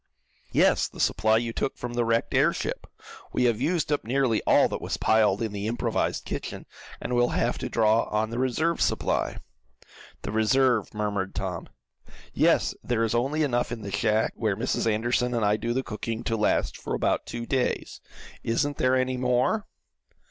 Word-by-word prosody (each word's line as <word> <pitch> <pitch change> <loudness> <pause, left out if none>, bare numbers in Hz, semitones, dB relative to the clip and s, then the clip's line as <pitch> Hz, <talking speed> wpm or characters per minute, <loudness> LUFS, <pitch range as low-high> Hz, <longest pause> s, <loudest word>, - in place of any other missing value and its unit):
"Yes, - - +3
the - - -14
supply 110 0 +3
you 115 0 -2
took 135 - -2
from 120 -1 -5
the 120 0 +1
wrecked 115 0 0
airship. - - 0 0.5
We 125 - +1
have 120 -2 +2
used 160 +1 0
up 145 - 0
nearly 125 -1 +1
all - - +5
that - - -5
was - - -3
piled 110 -1 +3
in 110 - -2
the 100 +1 -4
improvised 120 +2 -1
kitchen, - - -5 0.3
and 125 - -4
we'll 120 0 +3
have - - 0
to - - -4
draw 110 0 +3
on 110 +1 -1
the 120 - -3
reserve 150 +7 0
supply." - - 0 0.9
"The - - -4
reserve," 115 +1 +2
murmured 100 -2 -2
Tom. 95 -4 -4 0.6
"Yes, - - +3
there 115 -2 0
is 115 - 0
only 135 +6 +1
enough 125 -4 0
in 115 -2 -5
the 100 - -5
shack 110 +2 +1
where 105 -4 -1
Mrs. 115 -1 0
Anderson 120 +3 0
and 115 -3 +1
I 105 +1 +3
do 115 +2 -3
the 130 +2 0
cooking, 115 +1 -5
to 115 - -1
last 105 -1 +1
for - - -4
about - - 0
two 120 0 -5
days. 130 0 -1 0.4
Isn't 145 +5 0
there 130 0 +2
any 130 0 0
more?" 125 - +1
115 Hz, 180 wpm, -26 LUFS, 110-125 Hz, 0.9 s, all